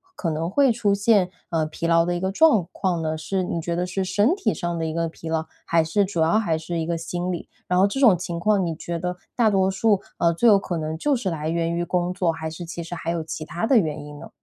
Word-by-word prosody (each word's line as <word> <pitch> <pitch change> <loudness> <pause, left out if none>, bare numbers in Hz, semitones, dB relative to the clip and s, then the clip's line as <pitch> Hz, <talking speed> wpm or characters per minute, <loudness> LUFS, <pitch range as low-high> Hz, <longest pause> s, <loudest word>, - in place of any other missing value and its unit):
可 170 - -2
能 160 +1 -2
会 270 +6 +4
出 215 -3 +1
现， 200 -2 +3 0.2
呃， 160 -2 0
疲 155 +2 -5
劳 165 0 +4
的 175 0 -1
一 175 - -3
个 190 0 0
状 225 - +4
况 180 -4 -1
呢？ 160 0 -2
是 185 +4 -2
你 170 - -2
觉 170 +1 -2
得 175 +1 0
是 185 +1 -2
身 205 - +2
体 390 +1 0
上 175 -2 -3
的 165 - -1
一 160 - -3
个 165 0 -1
疲 165 - -10
劳， 160 0 -1 0.2
还 165 -1 +3
是 180 +6 +1
主 185 -4 -2
要 165 +7 +3
还 165 -8 0
是 165 +1 -4
一 160 - -1
个 170 0 -1
心 175 +2 -4
理？ 170 - -6 0.2
然 180 - +1
后 190 - +6
这 200 +7 -2
种 230 -9 +6
情 170 -1 -4
况 200 +1 +2
你 165 - -2
觉 170 +1 -4
得 180 +1 -3 0.2
大 230 -3 +4
多 190 -2 +2
数 200 +1 +2 0.2
呃， 170 0 +3
最 235 +8 +2
有 210 -3 +7
可 185 -3 -3
能 155 0 -3
就 280 - +1
是 215 -5 -2
来 155 -2 -3
源 170 0 0
于 170 - -1
工 175 +1 -1
作， 180 -3 +1
还 160 -1 -5
是 160 +2 -7
其 170 0 -6
实 170 +1 -6
还 165 0 -3
有 170 -1 -2
其 160 - -5
它 170 +6 -3
的 260 - +5
原 155 -6 0
因 150 0 -10
呢？ - - -10
175 Hz, 305 characters per minute, -23 LUFS, 165-195 Hz, 0.2 s, 有